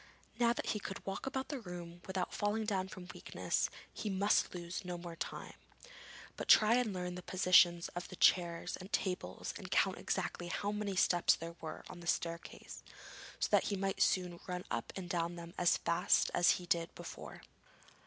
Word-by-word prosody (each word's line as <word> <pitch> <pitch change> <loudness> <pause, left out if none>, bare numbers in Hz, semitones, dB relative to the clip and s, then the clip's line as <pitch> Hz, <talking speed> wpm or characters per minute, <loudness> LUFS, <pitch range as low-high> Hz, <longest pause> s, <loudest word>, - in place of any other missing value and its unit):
Now 235 -1 +5
that - - -4
he 210 - -1
could 195 -1 -7
walk 195 +7 -4
about 265 0 -2
the 285 - -3
room 175 -4 -8
without 190 -1 -2
falling 210 +1 0
down 190 -3 0
from 185 -2 -9
weakness - - -1 0.2
he 215 - -3
must 200 0 +2
lose 175 +2 -5
no 180 -1 -4
more 170 -1 -7
time, - - -5 0.8
but - - -5
try 215 +1 +7
and 245 -3 +2
learn 180 -1 -3
the 180 - -6
positions 180 -2 +5
of 175 0 -6
the - - -9
chairs 175 -1 +3
and 185 +2 -10
tables 180 - -2
and - - -8
count - - +2
exactly 175 - -2
how 200 +3 -1
many 210 -2 -2
steps 175 -2 +4
there 170 +1 -7
were 160 - -6
on - - -9
the 170 - -10
staircase, 170 0 -3 0.6
so - - +1
that - - +5
he 205 - 0
might 195 0 -1
soon 180 -2 +2
run 180 -1 -3
up 115 - -2
and 190 -2 -5
down 170 0 -1
them 170 0 -9
as 175 - +3
fast 175 +4 +2
as 175 0 +5
he 180 - -5
did 170 -1 +1
before. - - -9
180 Hz, 190 wpm, -35 LUFS, 175-195 Hz, 0.8 s, try